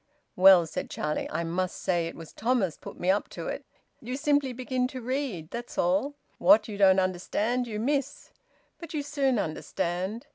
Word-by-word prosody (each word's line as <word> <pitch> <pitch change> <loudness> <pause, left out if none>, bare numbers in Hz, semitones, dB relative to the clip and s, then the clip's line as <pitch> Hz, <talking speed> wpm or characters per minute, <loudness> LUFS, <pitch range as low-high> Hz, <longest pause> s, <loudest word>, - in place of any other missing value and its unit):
"Well," 185 -2 +8
said 160 - -5
Charlie, 150 0 -2
"I 170 +2 -2
must 180 +2 -2
say 175 -3 0
it 165 - -7
was 165 -1 -11
Thomas 220 -7 0
put - - -11
me 180 +1 +3
up 200 - -1
to - - -6
it. - - -5 0.3
You 250 +3 -4
simply 285 -2 +2
begin 250 0 -1
to 260 0 -7
read, 250 - -3
that's 240 +1 -7
all. 195 +12 +1 0.2
What 215 0 +6
you 210 - -6
don't 195 -1 +5
understand, 205 +7 -1
you 210 -2 -4
miss. 280 +3 -2 0.5
But 335 -2 -8
you 290 - -1
soon 280 -3 +1
understand. 180 +4 -3
215 Hz, 180 wpm, -28 LUFS, 180-260 Hz, 0.5 s, Well